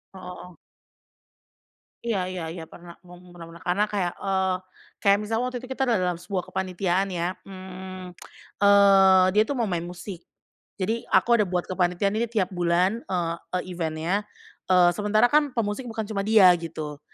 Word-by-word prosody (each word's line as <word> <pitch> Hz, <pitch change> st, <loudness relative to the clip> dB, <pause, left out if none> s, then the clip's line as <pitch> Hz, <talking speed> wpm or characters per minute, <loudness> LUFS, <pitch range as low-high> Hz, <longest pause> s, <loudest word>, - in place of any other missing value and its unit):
O 190 Hz, -, -9 dB, 0.3 s
heeh. 180 Hz, -, -16 dB, 1.5 s
Iya 225 Hz, -5 st, -1 dB
iya 185 Hz, -2 st, -5 dB
iya, 165 Hz, -1 st, -7 dB
pernah, 170 Hz, -1 st, -13 dB
mung 180 Hz, 0 st, -15 dB
pernah 170 Hz, -1 st, -11 dB
pernah. 165 Hz, 0 st, -13 dB
Karena 180 Hz, +4 st, +1 dB
kayak, 190 Hz, -4 st, -2 dB
eee, 190 Hz, -1 st, 0 dB, 0.4 s
kayak 200 Hz, -1 st, +4 dB
misalnya 225 Hz, +3 st, -1 dB
waktu 255 Hz, 0 st, -4 dB
itu 255 Hz, -, -10 dB
kita 265 Hz, -, -1 dB
dalam 180 Hz, -6 st, 0 dB
sebuah 185 Hz, 0 st, -3 dB
kepanitiaan 190 Hz, 0 st, -1 dB
ya, 180 Hz, -1 st, -2 dB, 0.2 s
mmm, 185 Hz, -1 st, -9 dB, 0.5 s
eee, 195 Hz, -2 st, +6 dB
dia 210 Hz, +2 st, +4 dB
tuh 285 Hz, -, -2 dB
mau 240 Hz, -, 0 dB
main 175 Hz, 0 st, -2 dB
musik. 175 Hz, 0 st, -8 dB, 0.6 s
Jadi 220 Hz, +4 st, -2 dB
aku -, -, +3 dB
ada 210 Hz, -, +3 dB
buat 180 Hz, -1 st, -1 dB
kepanitiaan 180 Hz, +1 st, 0 dB
ini 235 Hz, -, 0 dB
tiap 205 Hz, -5 st, -1 dB
bulan, 180 Hz, +4 st, +1 dB
eee, 170 Hz, -2 st, -1 dB, 0.2 s
e -, -, +3 dB
event-nya, 170 Hz, +4 st, -2 dB, 0.4 s
eee, 180 Hz, -1 st, +5 dB
sementara 210 Hz, +3 st, +3 dB
kan 295 Hz, -2 st, +3 dB
pemusik 230 Hz, +2 st, -2 dB
bukan 225 Hz, -1 st, -4 dB
cuma 200 Hz, -3 st, -2 dB
dia 210 Hz, -5 st, +7 dB
gitu, 155 Hz, -3 st, -6 dB
185 Hz, 165 wpm, -25 LUFS, 175-205 Hz, 1.5 s, dia